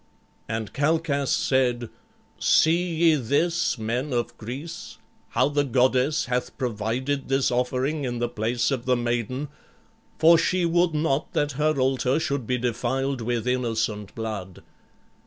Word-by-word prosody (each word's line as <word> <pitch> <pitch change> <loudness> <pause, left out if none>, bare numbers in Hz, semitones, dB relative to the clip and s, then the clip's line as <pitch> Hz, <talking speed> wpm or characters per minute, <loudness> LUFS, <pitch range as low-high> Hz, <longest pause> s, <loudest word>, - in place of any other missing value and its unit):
And 110 -2 -3
Calchas 145 -2 +1
said, 125 -3 +1 0.5
"See 170 +3 +3
ye 165 0 +5
this, 145 +6 +1
men 120 +5 -2
of 120 -1 -1
Greece, 130 +1 -7 0.3
how - - +2
the 145 0 +1
goddess 130 +3 +2
hath 125 0 -2
provided 125 +4 -2
this 135 -1 +2
offering 130 +4 0
in 120 -2 -2
the 120 0 0
place 120 +1 -1
of 130 -3 -2
the 125 -1 +2
maiden, 120 +4 -2 0.7
for 165 +1 +6
she 180 -1 +1
would 170 -1 +2
not 150 -2 0
that 145 0 +1
her 150 +1 0
altar 130 +1 +1
should 140 -7 -2
be 125 - +1
defiled 130 +2 -1
with 120 0 -2
innocent 115 -5 -1
blood. 105 -5 -6
130 Hz, 140 wpm, -25 LUFS, 120-145 Hz, 0.7 s, for